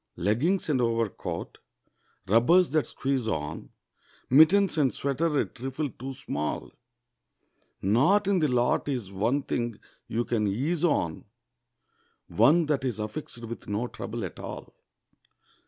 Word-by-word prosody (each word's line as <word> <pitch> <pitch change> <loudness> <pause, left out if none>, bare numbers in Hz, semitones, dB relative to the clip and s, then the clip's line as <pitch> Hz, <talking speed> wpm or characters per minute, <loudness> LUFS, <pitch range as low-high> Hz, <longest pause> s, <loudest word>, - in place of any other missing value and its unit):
Leggings 125 - +1
and 140 -5 +1
overcoat, 115 -3 -2 0.7
rubbers 125 - +4
that 155 -1 +1
squeeze 135 -4 -2
on, 75 -8 -3 0.6
Mittens 165 +8 +6
and 135 -4 +3
sweater 145 +2 0
a - - +2
trifle 135 +3 -5
too 135 +2 -7
small; 75 - -4 1.1
Not 140 - +3
in 200 -2 +3
the 155 - +2
lot 125 0 +1
is 120 -8 -3
one 115 +9 0
thing 120 -4 -2 0.3
you 120 +2 -1
can 110 -3 0
ease 145 - -1
on, 90 - 0 1.0
One 165 +3 +4
that's 135 -6 -1
affixed 115 +2 -6
with 115 +1 -8
no 105 +4 -1
trouble 115 -2 -5
at 90 - -8
all. - - -8
130 Hz, 125 wpm, -27 LUFS, 110-150 Hz, 1.1 s, Mittens